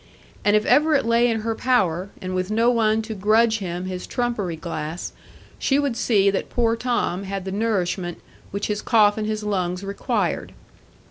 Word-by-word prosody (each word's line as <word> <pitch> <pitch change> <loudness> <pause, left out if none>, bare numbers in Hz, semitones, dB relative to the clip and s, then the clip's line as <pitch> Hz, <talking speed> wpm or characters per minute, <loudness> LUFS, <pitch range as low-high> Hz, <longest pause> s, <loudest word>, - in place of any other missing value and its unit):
And 205 0 +4
if 210 +1 +2
ever 305 +1 +4
it 275 - +2
lay 235 +1 +3
in 225 -1 -1
her 225 +1 -1
power, 195 -7 +1
and 185 0 -5
with 185 +1 -1
no 230 +3 +3
one 220 -2 +2
to 220 0 -5
grudge 220 +3 +3
him 180 -2 -4
his 185 -1 -5
trumpery 235 -8 -2
glass, 160 0 -5 0.5
she 270 - +2
would 285 -4 0
see 200 -4 +3
that 195 - -3
poor 230 -1 +1
Tom 235 -6 -1
had 195 -1 -4
the 190 - -4
nourishment 190 -4 -1 0.3
which 200 +1 -3
his 210 0 -2
cough 210 -2 +4
and 215 -1 -3
his 215 0 -2
lungs 185 -3 -1
required. 200 0 -2
210 Hz, 185 wpm, -23 LUFS, 185-230 Hz, 0.5 s, And